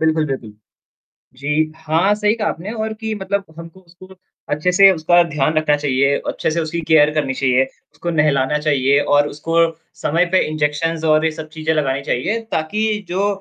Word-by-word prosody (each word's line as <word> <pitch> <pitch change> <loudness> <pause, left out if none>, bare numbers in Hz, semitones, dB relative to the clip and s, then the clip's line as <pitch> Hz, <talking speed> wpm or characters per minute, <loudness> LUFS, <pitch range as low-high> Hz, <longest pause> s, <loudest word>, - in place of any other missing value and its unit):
बिल्कुल 160 -1 +1
बिल्कुल। 130 -6 -5 0.9
जी, 140 +2 -4 0.3
हाँ, 160 +6 +1
सही 210 0 +1
कहा 220 -2 -2
आपने 185 +7 -5
और 220 -1 -3
कि 220 -1 -3
मतलब 200 0 -3
हमको 165 +2 -11
उसको 185 +1 -17 0.4
अच्छे 155 +5 0
से 195 +1 +7
उसका 175 +1 +3
ध्यान 150 +1 0
रखना 155 -1 +2
चाहिए 140 -1 +1
अच्छे - - -1
से - - +2
उसकी 165 +1 -3
केयर 150 -1 +6
करनी 140 -4 -1
चाहिए 130 0 +2 0.3
उसको 175 - -5
नहलाना 150 -1 +2
चाहिए 140 -1 +3 0.2
और 145 0 +4
उसको 165 +3 -4 0.5
समय 170 +4 +2
पे 185 - +5
इंजेक्शंस 155 +2 -1
और 155 0 +3
ये 160 - +2
सब 155 - -7
चीज़ें 155 0 -1
लगानी 140 -2 -1
चाहिए 210 - 0
ताकि 160 +7 -1 0.3
जो 190 +3 0
155 Hz, 180 wpm, -18 LUFS, 145-180 Hz, 0.9 s, से